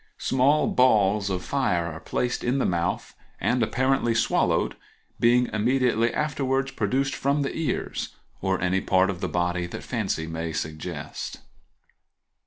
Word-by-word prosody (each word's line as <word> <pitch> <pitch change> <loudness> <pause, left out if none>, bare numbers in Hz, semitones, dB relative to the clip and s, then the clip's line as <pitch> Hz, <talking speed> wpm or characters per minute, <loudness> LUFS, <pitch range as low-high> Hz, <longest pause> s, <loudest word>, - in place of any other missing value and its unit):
Small 135 +4 +3
balls 105 -5 +3
of 90 -2 -2
fire 110 -12 +1
are 80 -1 -5
placed 120 +8 -2
in 125 +3 +1
the 135 - +1
mouth 85 -1 -1 0.3
and, 125 0 +1
apparently, 125 0 +1
swallowed, 115 - +1 0.4
being 120 +1 +4
immediately 120 +1 +2
afterwards 135 -2 -1
produced 135 +3 0
from 140 +1 +1
the 135 - -3
ears, 165 -2 -3 0.3
or 95 -1 0
any 95 +1 +1
part 95 +1 +3
of 90 -2 -8
the - - -1
body 90 0 0
that - - -7
fancy 100 -9 -2
may 80 0 -4
suggest. 80 0 -5
110 Hz, 140 wpm, -25 LUFS, 90-130 Hz, 0.4 s, being